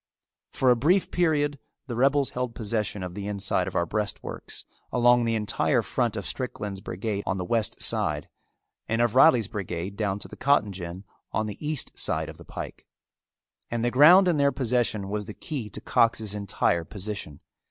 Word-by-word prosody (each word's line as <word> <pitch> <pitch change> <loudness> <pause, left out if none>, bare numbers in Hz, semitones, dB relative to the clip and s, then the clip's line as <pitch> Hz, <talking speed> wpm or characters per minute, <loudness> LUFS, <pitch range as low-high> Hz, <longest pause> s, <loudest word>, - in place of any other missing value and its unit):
For 130 -1 +3
a - - +5
brief 170 +11 +2
period 145 -5 +1 0.3
the 120 - -5
rebels 140 +3 +2
held 125 -2 -3
possession 105 -3 -2
of 90 -1 -5
the 100 +1 -5
inside 100 -1 +1
of - - -6
our 85 - +2
breastworks 105 +4 -4 0.3
along 120 -1 +4
the 115 0 +1
entire 105 -2 +1
front - - -1
of - - -4
Strickland's 100 -2 -4
brigade 100 +2 -3
on 95 - 0
the 90 - -3
west 110 +2 0
side, - - +2 0.6
and 115 - 0
of 120 -2 +2
Reilly's 125 -5 +6
brigade 95 -3 -5
down 100 -2 -1
to - - -8
the - - -11
cotton 135 -7 +2
gin 90 0 -7 0.3
on 110 - 0
the 105 +7 -7
east 150 -3 -2
side - - -1
of - - -10
the - - -12
pike; - - -8 0.8
and 120 0 -1
the 120 - +1
ground 175 +9 +7
in 170 -4 +2
their 140 -1 +3
possession 120 -6 0
was 105 0 -3
the 105 - -8
key 130 -9 -5
to - - -7
Cox's 110 -3 +1
entire 100 -4 0
position. 100 -6 -5
110 Hz, 185 wpm, -26 LUFS, 100-125 Hz, 0.8 s, ground